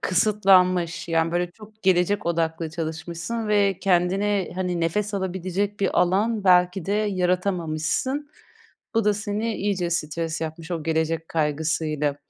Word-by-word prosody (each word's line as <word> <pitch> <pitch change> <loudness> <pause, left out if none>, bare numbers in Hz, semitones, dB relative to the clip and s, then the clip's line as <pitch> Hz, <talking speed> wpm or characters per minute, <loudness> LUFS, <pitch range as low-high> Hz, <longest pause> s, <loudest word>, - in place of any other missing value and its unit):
kısıtlanmış. 185 -4 +3
Yani, 165 0 +1
böyle, 175 0 0
çok 215 +3 -16
gelecek 190 +1 +2
odaklı 165 -1 -1
çalışmışsın 170 +7 -4
ve 200 -3 +2
kendine, 195 +1 +1
hani, 180 -2 -2
nefes 205 +5 -1
alabilecek 190 +2 -2
bir 195 - +2
alan 205 +4 +1
belki 180 -1 +4
de 200 - 0
yaratamamışsın. 185 - 0 0.6
Bu 225 -1 +2
da 210 0 +3
seni 210 +2 -2
iyice 190 -4 -1
stres 165 0 -2
yapmış 160 +1 -6
o 165 -3 -2
gelecek 160 +1 -1
kaygısıyla. 150 -1 0
180 Hz, 125 wpm, -24 LUFS, 165-205 Hz, 0.6 s, belki